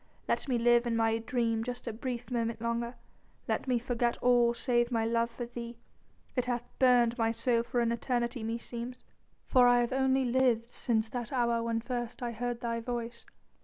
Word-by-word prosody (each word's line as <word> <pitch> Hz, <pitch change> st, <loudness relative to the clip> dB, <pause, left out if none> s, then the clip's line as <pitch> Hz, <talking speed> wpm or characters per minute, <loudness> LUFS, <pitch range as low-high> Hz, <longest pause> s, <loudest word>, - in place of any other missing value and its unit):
Let -, -, 0 dB
me 250 Hz, -3 st, +1 dB
live 240 Hz, +1 st, +4 dB
in 230 Hz, -, 0 dB
my 225 Hz, 0 st, +2 dB
dream 230 Hz, -1 st, 0 dB
just 245 Hz, +1 st, -5 dB
a 230 Hz, -, -3 dB
brief 245 Hz, +1 st, -5 dB
moment 230 Hz, -2 st, -1 dB
longer; 235 Hz, +1 st, -2 dB, 0.5 s
let -, -, -1 dB
me 250 Hz, -1 st, +2 dB
forget 240 Hz, 0 st, 0 dB
all 245 Hz, -1 st, +4 dB
save 240 Hz, -1 st, +1 dB
my 225 Hz, -2 st, +1 dB
love 230 Hz, 0 st, +1 dB
for 240 Hz, +1 st, -6 dB
thee. 235 Hz, 0 st, -7 dB, 0.6 s
It 250 Hz, -, +1 dB
hath 240 Hz, -1 st, -1 dB, 0.2 s
burned 245 Hz, -2 st, +4 dB
my 225 Hz, 0 st, +3 dB
soul 230 Hz, +1 st, +1 dB
for 240 Hz, +1 st, -1 dB
an 235 Hz, 0 st, +1 dB
eternity 240 Hz, 0 st, -1 dB
meseems, 235 Hz, +2 st, -5 dB, 0.4 s
for 250 Hz, -1 st, +5 dB
I 245 Hz, 0 st, +5 dB
have 240 Hz, +1 st, -1 dB
only 265 Hz, 0 st, +2 dB
lived 245 Hz, -2 st, +2 dB
since 220 Hz, -2 st, 0 dB
that 240 Hz, -2 st, -5 dB
hour 235 Hz, -3 st, +1 dB
when 230 Hz, 0 st, -1 dB
first 240 Hz, 0 st, -4 dB
I 240 Hz, -, -2 dB
heard 240 Hz, +1 st, -3 dB
thy 230 Hz, -1 st, -1 dB
voice 235 Hz, 0 st, -5 dB
240 Hz, 190 wpm, -31 LUFS, 230-245 Hz, 0.6 s, for